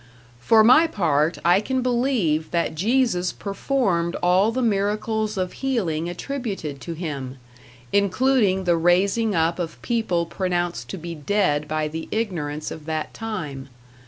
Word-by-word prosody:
For 220 - +5
my 280 +9 +6
part, 165 - +1
I 175 +3 +5
can 260 +3 -1
believe 240 - +1
that 170 -2 0
Jesus 200 0 +1
performed 195 -5 -1
all 185 +5 +4
the 255 +2 -1
miracles 215 0 0
of 185 -1 -2
healing 175 - -1
attributed 195 - -5
to 170 - -5
him 140 -6 -5 0.6
including 200 -1 +2
the 175 -2 +2
raising 195 +6 +2
up 165 +2 +1
of 165 -2 -4
people 220 -8 0
pronounced 175 -1 -2
to 195 - -5
be 170 0 -6
dead 150 -2 0
by 155 0 -1
the 160 +2 -6
ignorance 155 -9 -3
of 155 - -8
that 155 -1 -3
time. 150 -12 -5
185 Hz, 140 wpm, -23 LUFS, 160-220 Hz, 0.6 s, my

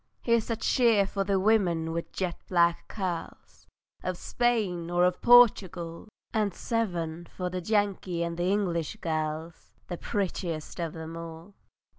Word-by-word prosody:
Here's 235 -1 +2
a 230 - +1
cheer 225 -2 +3
for 195 0 -2
the 195 -1 +1
women 185 -6 +2
with 170 0 -4
jet 180 -2 -2
black 170 -2 +2
curls, 185 -5 -6 0.3
Of 185 -1 -3
Spain 205 -10 0
or 175 0 +3
of 180 0 0
Portugal! 190 -8 +4 0.3
And 210 -4 0
seven 175 -7 -2
for 180 -1 -2
the 185 0 -3
Yankee 195 -3 0
and 170 0 -4
English 175 -3 0
girls, 160 0 -4
The 175 - -3
prettiest 180 -6 -3
of 165 -2 -2
them 160 0 -7
all! 165 +3 -9
180 Hz, 140 wpm, -28 LUFS, 170-205 Hz, 0.3 s, Portugal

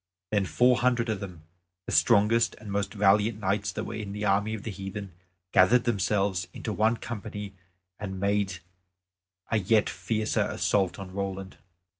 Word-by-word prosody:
Then 100 -3 +1
four 125 +5 +4
hundred 120 -2 +1
of 110 -3 -1
them, 90 -5 -8 0.4
the - - -5
strongest 115 +1 +4
and 105 -2 -8
most 100 0 -1
valiant 105 +2 +3
knights 100 +1 0
that 110 - -3
were - - -6
in 105 -2 -5
the 105 +1 -3
army 100 +2 +2
of 105 - -8
the 110 - -4
heathen, 95 0 -6 0.4
gathered 115 +7 +5
themselves 100 -4 0
into 110 - -4
one 110 +3 +2
company, 105 -3 -6 0.5
and 95 -3 -5
made 100 -2 0 0.9
a 110 - +3
yet 105 +2 +2
fiercer 110 -1 -1
assault 95 -3 0
on 95 -2 -8
Roland. 95 -1 -4
105 Hz, 160 wpm, -28 LUFS, 95-110 Hz, 0.9 s, gathered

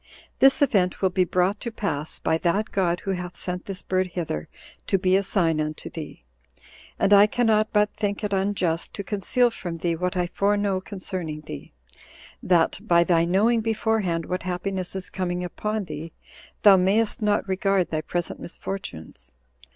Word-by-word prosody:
This 270 +2 +6
event 195 -9 +1
will 190 - +3
be 185 0 +2
brought 185 +4 +1
to 235 - -5
pass 160 -9 -3
by 160 - 0
that 195 +5 0
God 175 -3 0
who 195 - -2
hath 180 -1 -5
sent 180 0 -4
this 195 -1 -7
bird 185 0 0
hither 165 - -4 0.4
to 195 - +3
be 185 0 +2
a 195 - +4
sign 165 -5 +1
unto 155 0 -5
thee. - - -8 0.7
And 205 - +3
I 205 +1 +8
cannot 215 -1 +2
but 210 0 +2
think 205 0 -2
it 205 -1 -1
unjust 190 -4 0
to 200 - -4
conceal 220 +5 +1
from 175 -6 -5
thee 170 0 -1
what 180 +3 -2
I 180 - +1
foreknow 200 +1 0
concerning 185 -6 -5
thee, 75 - -9 0.7
that, 175 -3 +2
by 170 -1 +4
thy 170 -1 +3
knowing 215 +6 +3
beforehand 215 -6 0
what 180 - -3
happiness 185 +1 -3
is 190 0 -3
coming 180 -1 -2
upon 210 +4 -3
thee, 155 -1 -7 0.5
thou 200 -2 +8
mayst 205 +5 +2
not 210 -1 +1
regard 190 -1 +1
thy 155 -1 -1
present 175 +2 -3
misfortunes. 165 - -7
185 Hz, 170 wpm, -24 LUFS, 175-205 Hz, 0.7 s, I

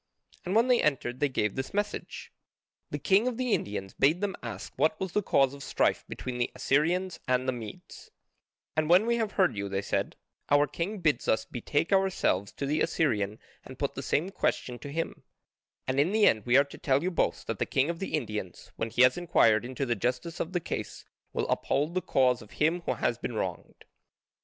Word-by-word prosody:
And 185 +3 -2
when 230 +3 +5
they 250 -1 +4
entered 130 -4 0
they 145 - +2
gave 105 -6 0
this 130 +7 -5
message: 205 0 -3 0.6
The - - -3
king 205 +4 +3
of 245 -3 -2
the 250 -3 0
Indians 95 -2 -2
bade 150 +6 +3
them 205 -1 -2
ask 110 -5 -7
what 155 0 +1
was 190 -2 -3
the 210 - +1
cause 135 -8 +3
of 140 - -10
strife - - +1
between 125 -1 -5
the 120 - 0
Assyrians 165 +8 +1
and 130 0 +1
the - - +3
Medes, 115 -4 -9 0.7
"And 155 0 +1
when 180 +5 +6
we 235 0 +2
have 220 -3 -1
heard 190 - +3
you," 100 -1 -3
they 95 0 -2
said, - - -1 0.3
"our 145 0 +5
king 185 +7 -4
bids 155 -7 +1
us 110 0 +2
betake 145 - -1
ourselves 190 - +1
to 140 - -4
the 150 +3 0
Assyrian 110 -11 +1 0.3
and 130 - -11
put 140 0 -2
the 135 - -5
same 160 +7 0
question 125 -9 -1
to 140 - -8
him, 165 +2 -3 0.7
and 130 +1 0
in 155 +6 +3
the 215 0 +4
end 110 0 +3
we 120 +2 +6
are 140 - +7
to 140 - -13
tell 135 +1 +2
you 185 - 0
both - - 0
that - - -4
the - - 0
king 135 +2 +2
of 165 - -8
the 195 - -2
Indians, 105 - -5
when 115 - -2
he 125 +3 +4
has 130 +5 +4
enquired 115 -11 +4
into 130 +2 -3
the 120 - +1
justice 130 - -2
of 165 - -2
the 180 - 0
case, - - -5 0.3
will - - -2
uphold 150 +4 0
the 185 - 0
cause 130 -8 +2
of 110 - -14
him 160 +4 +1
who - - +1
has - - -1
been - - -4
wronged." - - -5
145 Hz, 215 wpm, -29 LUFS, 125-180 Hz, 0.7 s, are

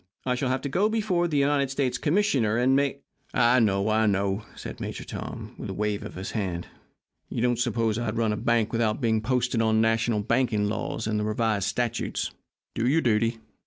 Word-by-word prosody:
I 125 - +1
shall 125 +1 -1
have 130 0 0
to - - -3
go 190 +10 +2
before 205 -6 +1
the 150 -3 -1
United 140 -1 +2
States 130 -2 -1
Commissioner 145 - +2
and 130 +2 +3
make 140 0 0 0.2
" - - -33
"I 125 +1 +5
know, 100 -3 +2
I 110 0 +3
know," 100 +1 0
said - - -8
Major - - -5
Tom, - - -7
with - - -5
a - - -4
wave 105 0 -1
of 105 - -8
his 95 +1 -5
hand. 90 -6 -2 0.6
"You 115 - -2
don't 120 -1 +2
suppose 115 -2 0
I'd 115 -1 -2
run 110 -2 +1
a - - -3
bank 115 -1 +1
without 115 -2 +1
being 110 -4 +1
posted 125 0 +1
on 110 -1 +3
national 115 -1 +2
banking 115 -1 +1
laws 105 - -3
and 105 -1 0
the - - -1
revised 105 -2 0
statutes! 120 +1 -2 0.4
Do 115 - 0
your 155 +5 +3
duty. 115 -1 +1
115 Hz, 205 wpm, -26 LUFS, 105-130 Hz, 0.6 s, I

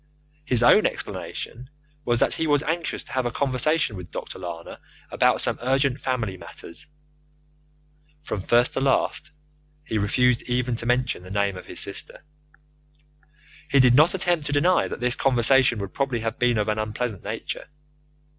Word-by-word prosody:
His 125 -4 +4
own - - +6
explanation 125 +2 -6 0.4
was 120 -1 +1
that - - +3
he 160 - -1
was 145 -1 +3
anxious 165 +1 -2
to - - -14
have 130 -2 0
a - - -3
conversation 140 0 +1
with 90 -2 -9
Dr. - - -7
Lana 85 -2 -7 0.3
about - - +2
some - - 0
urgent 135 +1 +1
family 115 -7 -2
matters 85 -1 -9 1.4
(from 105 - -4
first 120 +5 +2
to - - -1
last 140 +3 +1 0.5
he 110 -8 -2
refused 125 +4 +2
even 125 0 0
to 115 - -5
mention 125 -4 0
the 90 - -12
name 100 0 0
of 90 - -10
his - - -6
sister). - - -6 1.4
He 140 -1 +4
did 125 -2 +6
not 155 +8 +5
attempt 175 -5 +1
to - - -3
deny 170 +5 +3
that - - -7
this 125 0 +2
conversation 130 -1 +3
would 100 -2 -6
probably 135 -4 -1
have 115 0 -4
been 125 -1 +2
of 105 0 0
an 105 0 0
unpleasant 110 -1 -3
nature. 110 +2 -5
125 Hz, 165 wpm, -24 LUFS, 110-135 Hz, 1.4 s, own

